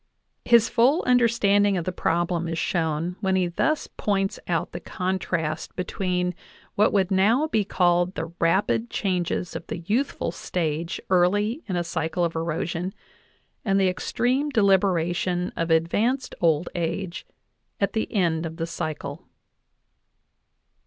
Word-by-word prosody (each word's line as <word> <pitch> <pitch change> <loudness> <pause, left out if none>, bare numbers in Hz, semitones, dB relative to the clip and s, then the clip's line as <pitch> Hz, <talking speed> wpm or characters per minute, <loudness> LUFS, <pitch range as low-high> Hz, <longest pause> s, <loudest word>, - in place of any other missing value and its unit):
His 235 -1 +6
full 255 +9 +3
understanding 205 -5 +3
of 170 - -3
the 185 - -1
problem 170 0 0
is 165 0 -3
shown 165 +1 -1
when 190 -2 +1
he 185 -1 +2
thus 295 - 0
points 195 -2 -1
out 165 -3 -1
the 175 - -5
contrast 180 -5 -3
between 180 -1 -1 0.4
what 210 - +3
would 195 -1 +1
now 215 +10 +3
be 220 -9 +1
called 175 -1 +2
the 165 +1 -5
rapid 200 +7 +2
changes 180 -2 -1
of - - -6
the - - -4
youthful 240 +9 0
stage 165 0 -3
early 205 - +2
in 185 - -2
a 175 - 0
cycle 165 +1 -1
of 165 - -3
erosion 170 +3 -2 0.7
and 195 -2 +2
the 190 -1 +4
extreme 255 +9 0
deliberation 185 - +2
of 165 0 -2
advanced 205 +11 +1
old 165 -1 +2
age 175 +1 -3 0.5
at 200 -1 0
the 220 - -2
end 170 -5 +1
of 160 0 -9
the 165 - -2
cycle. 155 -2 -5
180 Hz, 140 wpm, -25 LUFS, 170-205 Hz, 0.7 s, His